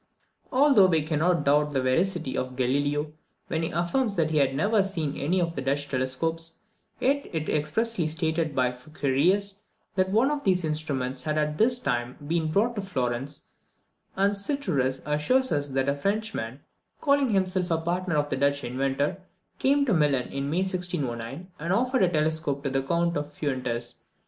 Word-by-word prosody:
69. 260 Hz, +2 st, +2 dB
Although 275 Hz, -10 st, +7 dB
we 165 Hz, -4 st, +2 dB
cannot 160 Hz, +1 st, +1 dB
doubt 150 Hz, +1 st, +3 dB
the 135 Hz, -, +1 dB
veracity 135 Hz, +1 st, +1 dB
of 130 Hz, 0 st, -3 dB
Galileo, 145 Hz, +4 st, 0 dB, 0.4 s
when 160 Hz, -, -1 dB
he 165 Hz, -, -1 dB
affirms 200 Hz, +6 st, 0 dB
that 160 Hz, -3 st, +1 dB
he 155 Hz, -, +1 dB
had 135 Hz, -1 st, +2 dB
never 205 Hz, +8 st, +3 dB
seen 165 Hz, -7 st, -2 dB
any 170 Hz, +7 st, 0 dB
of 170 Hz, -1 st, 0 dB
the 140 Hz, -, -2 dB
Dutch 140 Hz, +2 st, -1 dB
telescopes, 160 Hz, +6 st, -2 dB, 0.4 s
yet 280 Hz, +2 st, +1 dB
it 160 Hz, -2 st, -3 dB
is -, -, 0 dB
expressly 165 Hz, +5 st, 0 dB
stated 160 Hz, -1 st, -1 dB
by 125 Hz, -1 st, +2 dB
Fuccarius, 155 Hz, +9 st, 0 dB, 0.3 s
that 185 Hz, 0 st, +1 dB
one 230 Hz, +8 st, +3 dB
of 295 Hz, -1 st, -2 dB
these 180 Hz, -3 st, +2 dB
instruments 140 Hz, -4 st, -2 dB
had 155 Hz, 0 st, -2 dB
at 150 Hz, 0 st, -1 dB
this 245 Hz, +2 st, +4 dB
time 125 Hz, -, -2 dB
been 160 Hz, +1 st, 0 dB
brought 215 Hz, +8 st, +2 dB
to -, -, 0 dB
Florence; 135 Hz, -5 st, -3 dB, 0.7 s
and 200 Hz, +1 st, +2 dB
Sirturus 180 Hz, -, -1 dB
assures 255 Hz, -, +1 dB
us 145 Hz, -1 st, +1 dB
that 135 Hz, -1 st, -1 dB
a 140 Hz, -, +2 dB
Frenchman, 195 Hz, -, -2 dB, 0.4 s
calling 280 Hz, -3 st, +3 dB
himself 185 Hz, -3 st, +1 dB
a 165 Hz, -, +2 dB
partner 170 Hz, 0 st, -1 dB
of 145 Hz, 0 st, +1 dB
the 135 Hz, -, -1 dB
Dutch 140 Hz, +1 st, +1 dB
inventor, 135 Hz, +7 st, -1 dB, 0.4 s
came 280 Hz, +1 st, +3 dB
to 235 Hz, -, +2 dB
Milan 145 Hz, -6 st, +2 dB
in 140 Hz, +1 st, -3 dB
May 175 Hz, +5 st, +1 dB
1609, 175 Hz, -5 st, -3 dB
and 165 Hz, +3 st, -2 dB
offered 250 Hz, +6 st, +2 dB
a 185 Hz, -, +4 dB
telescope 155 Hz, -3 st, 0 dB
to 140 Hz, -, -1 dB
the 135 Hz, 0 st, +1 dB
Count 170 Hz, +5 st, 0 dB
de 145 Hz, -, -1 dB
Fuentes. 130 Hz, -5 st, -3 dB
155 Hz, 180 wpm, -26 LUFS, 140-190 Hz, 0.7 s, Although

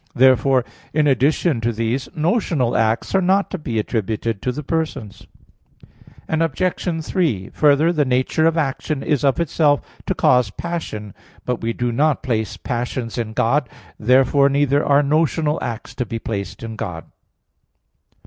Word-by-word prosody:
Therefore, 130 Hz, 0 st, +4 dB, 0.3 s
in 155 Hz, 0 st, +2 dB
addition 140 Hz, 0 st, +2 dB
to 120 Hz, +1 st, 0 dB
these, 115 Hz, +4 st, -2 dB
notional 160 Hz, -, 0 dB
acts 110 Hz, 0 st, +1 dB
are 190 Hz, -, +3 dB
not 190 Hz, +2 st, +2 dB
to 190 Hz, -, -4 dB
be 120 Hz, -7 st, -4 dB
attributed 110 Hz, -1 st, -2 dB
to 125 Hz, -, -1 dB
the 150 Hz, +4 st, -6 dB
persons. 150 Hz, -9 st, -4 dB, 1.0 s
Obj. 165 Hz, +1 st, -1 dB
3: 145 Hz, -, -1 dB
Further, 150 Hz, +3 st, +4 dB
the 150 Hz, -3 st, +2 dB
nature 130 Hz, +5 st, +1 dB
of 165 Hz, 0 st, +1 dB
action 145 Hz, -1 st, -2 dB
is 145 Hz, -3 st, 0 dB
of 140 Hz, +3 st, +2 dB
itself 150 Hz, -3 st, +2 dB, 0.2 s
to -, -, 0 dB
cause 125 Hz, -4 st, +3 dB
passion. 105 Hz, -, -5 dB, 0.3 s
But 125 Hz, -1 st, -2 dB
we 115 Hz, 0 st, -1 dB
do 120 Hz, 0 st, -1 dB
not 145 Hz, +5 st, +1 dB
place 110 Hz, -6 st, -2 dB
passions 120 Hz, -1 st, -3 dB
in 110 Hz, -2 st, -3 dB
God. 125 Hz, +4 st, +1 dB, 0.3 s
Therefore 130 Hz, +4 st, +4 dB
neither 140 Hz, +1 st, +2 dB
are 145 Hz, +1 st, +4 dB
notional 155 Hz, +1 st, +1 dB
acts 120 Hz, -2 st, -5 dB
to 125 Hz, -, -3 dB
be 115 Hz, -, -3 dB
placed 100 Hz, -3 st, -5 dB
in 115 Hz, -1 st, -6 dB
God. 90 Hz, -8 st, -5 dB
135 Hz, 150 wpm, -20 LUFS, 115-155 Hz, 1.0 s, Therefore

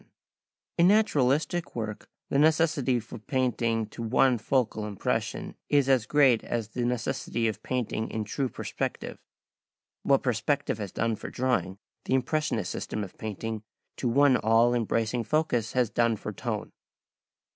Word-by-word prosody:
Photo -, -, -27 dB
Anderson] -, -, -52 dB
In 170 Hz, -, +6 dB
naturalistic 155 Hz, -3 st, +1 dB
work 110 Hz, -3 st, -5 dB, 0.2 s
the 140 Hz, -, +2 dB
necessity 150 Hz, -5 st, +3 dB
for 115 Hz, +1 st, -9 dB
painting 115 Hz, -2 st, 0 dB
to 115 Hz, -, -9 dB
one 125 Hz, +2 st, +3 dB
focal 110 Hz, -3 st, 0 dB
impression 100 Hz, -2 st, -2 dB, 0.2 s
is 145 Hz, -2 st, +3 dB
as 130 Hz, -5 st, +3 dB
great 135 Hz, -6 st, +4 dB
as 115 Hz, -3 st, -3 dB
the 120 Hz, +2 st, -3 dB
necessity 120 Hz, -1 st, -1 dB
of 110 Hz, -, -3 dB
painting 120 Hz, -3 st, -2 dB
in 110 Hz, -, -3 dB
true 130 Hz, +5 st, -2 dB
perspective. -, -, -4 dB, 0.8 s
What 135 Hz, -1 st, +3 dB
perspective 125 Hz, 0 st, 0 dB
has 100 Hz, -3 st, -5 dB
done 115 Hz, -1 st, -1 dB
for -, -, -7 dB
drawing, 125 Hz, -7 st, -1 dB, 0.3 s
the 130 Hz, -, +1 dB
impressionist 130 Hz, -, 0 dB
system 105 Hz, -, -4 dB
of 95 Hz, -, -10 dB
painting 110 Hz, +1 st, -4 dB, 0.4 s
to 125 Hz, -, -1 dB
one 140 Hz, +1 st, +5 dB
all 115 Hz, +2 st, +4 dB
embracing 115 Hz, 0 st, 0 dB
focus 125 Hz, -4 st, 0 dB
has 125 Hz, -3 st, +1 dB
done 115 Hz, -1 st, +2 dB
for -, -, -6 dB
tone. -, -, -4 dB
120 Hz, 150 wpm, -28 LUFS, 110-135 Hz, 0.8 s, In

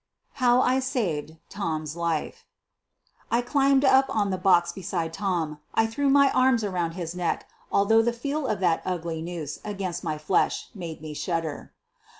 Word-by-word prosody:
HOW 245 Hz, 0 st, +5 dB
I 255 Hz, +1 st, +3 dB
SAVED 170 Hz, -, -2 dB
TOM'S 160 Hz, -6 st, -3 dB
LIFE 170 Hz, -2 st, -2 dB, 0.9 s
I 235 Hz, +1 st, +2 dB
climbed 275 Hz, +1 st, +3 dB
up 265 Hz, 0 st, +6 dB
on 205 Hz, -3 st, 0 dB
the 185 Hz, -, -1 dB
box 175 Hz, -2 st, +4 dB
beside 170 Hz, -3 st, -3 dB
Tom; 165 Hz, -6 st, -2 dB, 0.2 s
I 225 Hz, -, +4 dB
threw 275 Hz, +6 st, 0 dB
my 280 Hz, 0 st, +5 dB
arms 255 Hz, -3 st, +3 dB
around 175 Hz, -5 st, -1 dB
his 170 Hz, -2 st, -5 dB
neck, 180 Hz, -2 st, -2 dB, 0.2 s
although 220 Hz, +3 st, +4 dB
the 235 Hz, +1 st, +1 dB
feel 280 Hz, +4 st, -3 dB
of 210 Hz, -, -1 dB
that 170 Hz, -3 st, +2 dB
ugly 170 Hz, -3 st, -3 dB
noose 165 Hz, -4 st, -5 dB
against 195 Hz, -4 st, -4 dB
my 155 Hz, -3 st, -2 dB
flesh 155 Hz, +5 st, 0 dB
made 165 Hz, -5 st, -7 dB
me 155 Hz, -1 st, -6 dB
shudder. 165 Hz, -1 st, -3 dB
185 Hz, 160 wpm, -26 LUFS, 165-235 Hz, 0.9 s, up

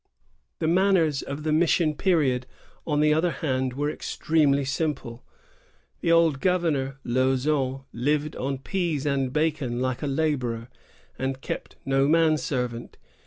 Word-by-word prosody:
The -, -, -1 dB
manners 170 Hz, -5 st, +3 dB
of 140 Hz, +2 st, -6 dB
the 155 Hz, -, 0 dB
mission 160 Hz, 0 st, +3 dB
period, 145 Hz, -9 st, +1 dB, 0.4 s
on 150 Hz, -2 st, +1 dB
the 150 Hz, 0 st, +4 dB
other 160 Hz, +3 st, +2 dB
hand, 130 Hz, -6 st, -1 dB
were 145 Hz, +3 st, -1 dB
extremely 145 Hz, -4 st, +1 dB
simple. 135 Hz, -4 st, -3 dB, 0.8 s
The 165 Hz, -, +1 dB
old 165 Hz, -4 st, +4 dB
governor, 160 Hz, -8 st, 0 dB
Lauzon, 130 Hz, +2 st, +1 dB
lived 150 Hz, +5 st, 0 dB
on 135 Hz, +1 st, -2 dB
pease 160 Hz, 0 st, -2 dB
and 135 Hz, -3 st, 0 dB
bacon 150 Hz, -5 st, 0 dB
like 130 Hz, -1 st, -1 dB
a 150 Hz, -, -2 dB
laborer, 130 Hz, -6 st, -1 dB, 0.5 s
and 130 Hz, 0 st, -2 dB
kept -, -, -6 dB
no 135 Hz, 0 st, +2 dB
man 160 Hz, 0 st, +4 dB
servant. 125 Hz, -4 st, -3 dB
145 Hz, 135 wpm, -25 LUFS, 130-160 Hz, 0.8 s, the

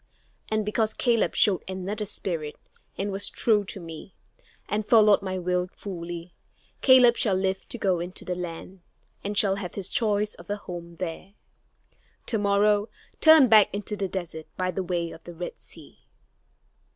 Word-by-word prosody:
And 215 Hz, -1 st, 0 dB
because 215 Hz, +1 st, 0 dB
Caleb 235 Hz, -3 st, +1 dB
showed 195 Hz, -4 st, +3 dB
another 190 Hz, +3 st, -4 dB
spirit 165 Hz, -7 st, -3 dB, 0.4 s
and 200 Hz, +1 st, -2 dB
was 195 Hz, +1 st, +1 dB
true 215 Hz, -3 st, +2 dB
to 195 Hz, -, -2 dB
me, 165 Hz, +2 st, -10 dB, 0.5 s
and 210 Hz, +1 st, -1 dB
followed 210 Hz, -2 st, +5 dB
my 185 Hz, -1 st, -3 dB
will 180 Hz, 0 st, -1 dB
fully, 175 Hz, -2 st, -7 dB, 0.5 s
Caleb 250 Hz, -3 st, +7 dB
shall 210 Hz, -8 st, +2 dB
live 190 Hz, 0 st, -2 dB
to -, -, -3 dB
go 190 Hz, -5 st, +1 dB
into 175 Hz, +2 st, -6 dB
the 180 Hz, -, -2 dB
land, 180 Hz, +1 st, -7 dB, 0.4 s
and 205 Hz, +1 st, -3 dB
shall 195 Hz, -2 st, +4 dB
have 180 Hz, -3 st, -6 dB
his 195 Hz, -3 st, -2 dB
choice 210 Hz, -2 st, 0 dB
of -, -, -14 dB
a 205 Hz, -, 0 dB
home 170 Hz, -3 st, -9 dB
there. 180 Hz, +3 st, -6 dB, 0.9 s
To 220 Hz, -, -1 dB
morrow, 205 Hz, +1 st, +2 dB, 0.3 s
turn 315 Hz, -4 st, +8 dB
back 215 Hz, -3 st, +6 dB
into 205 Hz, +1 st, -4 dB
the 200 Hz, -1 st, -2 dB
desert 175 Hz, -4 st, -6 dB
by 185 Hz, 0 st, 0 dB
the 185 Hz, -, -3 dB
way 170 Hz, -2 st, -2 dB
of 160 Hz, -, -12 dB
the 175 Hz, -, -10 dB
Red 175 Hz, +2 st, -7 dB
Sea." -, -, -14 dB
195 Hz, 165 wpm, -26 LUFS, 180-210 Hz, 0.9 s, turn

